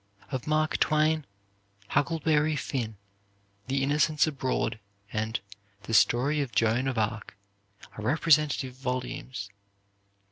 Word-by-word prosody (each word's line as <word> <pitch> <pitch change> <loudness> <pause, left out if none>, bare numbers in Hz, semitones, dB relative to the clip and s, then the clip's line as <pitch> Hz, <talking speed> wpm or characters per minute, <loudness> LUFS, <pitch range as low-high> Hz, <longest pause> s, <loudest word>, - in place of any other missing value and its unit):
Of 130 -1 -4
Mark 155 0 +1
Twain, 155 -1 +2 0.6
"Huckleberry 155 0 +2
Finn," 120 -7 -3 0.7
"The 135 +1 0
Innocents 150 +2 +3
Abroad," 135 -6 -1 0.3
and 110 +1 -1 0.4
the 110 - -5
"Story 135 +7 +4
of 135 -4 -3
Joan 115 +4 +2
of 130 -3 -2
Arc" 110 -1 -2 0.6
are 105 - -7
representative 150 0 +2
volumes. 125 -4 -4
135 Hz, 105 wpm, -28 LUFS, 115-150 Hz, 0.7 s, Story